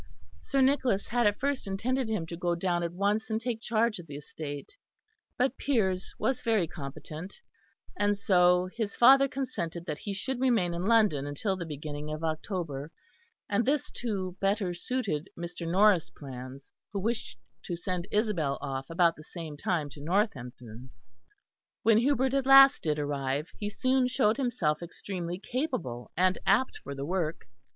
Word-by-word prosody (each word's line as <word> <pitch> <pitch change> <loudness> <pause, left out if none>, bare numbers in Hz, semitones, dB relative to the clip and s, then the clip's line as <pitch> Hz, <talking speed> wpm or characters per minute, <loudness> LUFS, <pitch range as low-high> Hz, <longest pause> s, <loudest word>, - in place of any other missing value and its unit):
Sir 275 -1 0
Nicholas 260 -6 +2
had 240 -1 +3
at 205 - +1
first 280 -5 -1
intended 240 +5 -1
him 210 -7 -1
to 170 - -6
go 175 0 0
down 175 0 0
at 170 -1 -2
once 205 +5 0
and 220 0 0
take 230 -1 -3
charge 230 -2 +1
of 170 - -10
the 145 - -8
estate; 145 - -7 0.6
but 260 0 +1
Piers 190 -9 0
was 260 - 0
very 220 -6 +2
competent, 155 +3 -8 0.6
and 205 0 +1
so 180 -2 +4
his 220 -4 -2
father 270 +3 +7
consented 175 -12 -4
that 150 -2 -4
he 200 - -4
should 255 +6 -3
remain 225 -10 +2
in 175 +3 -2
London 210 -12 +3
until 190 +8 -1
the 175 -3 -5
beginning 150 0 -5
of 155 +1 -5
October; 160 -3 -3 0.6
and 205 +3 +1
this 280 +3 0
too 195 -6 -3
better 195 -2 +1
suited 185 - -2
Mr. 170 -1 -5
Norris' 195 -2 +4
plans 130 -1 -9 0.2
who 200 - -1
wished 225 +4 -2 0.3
to 175 - -3
send 180 +1 -3
Isabel 195 -10 0
off 135 -1 -4
about 165 0 +3
the 155 - -11
same 160 -2 -7
time 155 0 -1
to 145 - -10
Northampton. 130 - -2 0.9
When 225 -1 +5
Hubert 265 +1 +2
at 270 -1 +1
last 270 +1 +8
did 150 -2 0
arrive, 145 0 -2
he 205 - -3
soon 255 +4 +2
showed 250 -3 +2
himself 220 - 0
extremely 175 0 -5
capable 200 - -3
and 185 +1 +3
apt 205 +7 +3
for 140 +1 -7
the 135 0 -4
work. 165 -1 -2
185 Hz, 165 wpm, -29 LUFS, 155-230 Hz, 0.9 s, last